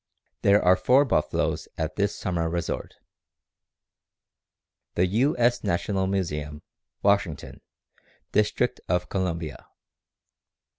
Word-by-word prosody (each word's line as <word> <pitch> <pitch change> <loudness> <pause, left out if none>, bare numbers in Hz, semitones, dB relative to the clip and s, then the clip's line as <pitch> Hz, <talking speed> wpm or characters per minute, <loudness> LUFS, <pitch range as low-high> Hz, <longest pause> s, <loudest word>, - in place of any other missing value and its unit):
_ - - -55
There 100 +1 +4
are 90 +1 +7
four 130 +8 +4
buffaloes 75 - 0
at 80 +1 -3
this 100 0 0
summer 85 -3 -2
resort. 85 0 -3 2.0
_The 90 +2 +3
U. 125 - +1
S. 120 0 +2
National 95 +2 0
Museum, 75 -6 -3 0.4
Washington, 100 -7 0 0.7
District - - +1
of 90 +1 0
Columbia. 85 -6 -3
90 Hz, 100 wpm, -26 LUFS, 85-100 Hz, 2.0 s, are